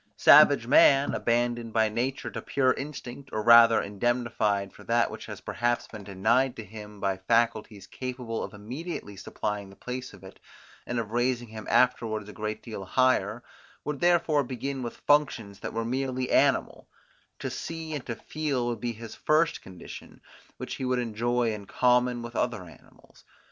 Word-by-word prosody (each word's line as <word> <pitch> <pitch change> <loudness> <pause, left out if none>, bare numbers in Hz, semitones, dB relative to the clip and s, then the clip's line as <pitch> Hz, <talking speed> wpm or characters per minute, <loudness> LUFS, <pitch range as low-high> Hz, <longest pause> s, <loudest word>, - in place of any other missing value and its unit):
Savage - - +7
man, 140 0 +5
abandoned 120 -1 0
by 110 -1 +3
nature 120 +5 -3
to - - -5
pure 130 -2 +2
instinct, 140 -2 -8
or 110 - -2
rather 115 0 +8
indemnified 105 -2 -1
for - - -14
that 115 -1 +2
which 110 0 -8
has 105 -3 -8
perhaps 120 -1 -1
been 110 -2 -10
denied 110 +7 +1
to 110 - -7
him 105 0 -11
by 95 -1 -1
faculties 110 0 0
capable 125 -3 -5
of - - -6
immediately 115 - -7
supplying 100 +1 -4
the 95 - -15
place 125 +3 -6
of 95 -2 -15
it, 95 - -13 0.5
and 120 - -2
of 110 -2 -3
raising 120 0 0
him 110 -1 -9
afterwards 115 -4 +2
a 105 - -10
great 110 0 -5
deal 110 -4 -7
higher, 120 0 +1 0.4
would 150 -2 -4
therefore 170 -4 +3
begin 130 +2 -4
with 120 -1 -6
functions 125 -9 +2
that - - -5
were 115 0 -3
merely 130 +1 -2
animal: - - +2 0.5
to - - -5
see 165 -1 -5
and 145 -4 -4
to 115 - -3
feel 145 -4 -2
would 120 -2 -2
be 120 -1 -2
his 115 0 -9
first 160 +2 +1
condition, 95 -1 -11 0.4
which - - -6
he - - -5
would 130 0 +1
enjoy 120 0 0
in 105 -1 -7
common 125 -1 +2
with 120 0 -8
other 120 -6 -1
animals. 85 - -18
120 Hz, 170 wpm, -27 LUFS, 110-130 Hz, 0.5 s, rather